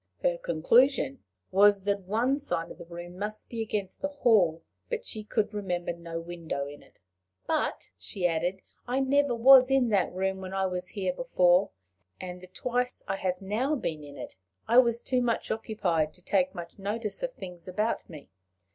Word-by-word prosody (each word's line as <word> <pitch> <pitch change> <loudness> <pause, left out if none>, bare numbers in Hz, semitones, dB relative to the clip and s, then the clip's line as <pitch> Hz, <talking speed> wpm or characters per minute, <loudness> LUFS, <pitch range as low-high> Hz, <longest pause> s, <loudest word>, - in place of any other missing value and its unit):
Her - - +1
conclusion 225 - +3 0.3
was 200 0 +5
that 200 0 +1
one 245 +7 +1
side 165 - -3
of - - -11
the - - -9
room 175 +1 -9
must 215 +1 -4
be 230 -1 -4
against 205 -3 -3
the 285 - +1
hall, 215 - +3 0.3
but 475 -2 -3
she 215 -2 -3
could 210 0 -1
remember 180 -4 -2
no 170 -1 -6
window 165 -4 -4
in 145 +1 -10
it. - - -22 0.5
"But," - - -1
she 185 -3 -4
added, 175 +3 0 0.2
"I 250 +2 0
never 275 -1 +2
was 255 +2 +8
in 270 -3 +3
that 200 -4 +2
room 190 +1 -2
when 190 0 -6
I 190 0 +1
was 180 -1 -2
here 190 -3 -2
before, 180 -6 +3 0.5
and, 180 -1 -7
the 185 - -11
twice 250 +6 -2
I 195 - -1
have 185 0 -2
now 235 +10 0
been 160 - -3
in 145 -1 -11
it, - - -8 0.3
I 235 +3 +7
was 235 -2 +3
too 255 -1 +1
much 235 -2 -1
occupied 185 -9 -1
to 180 - -18
take 185 0 +1
much 170 +2 -8
notice 210 +2 -3
of - - -3
things 180 - -9
about 210 +5 -1
me. 150 - -11
195 Hz, 185 wpm, -28 LUFS, 175-235 Hz, 0.5 s, was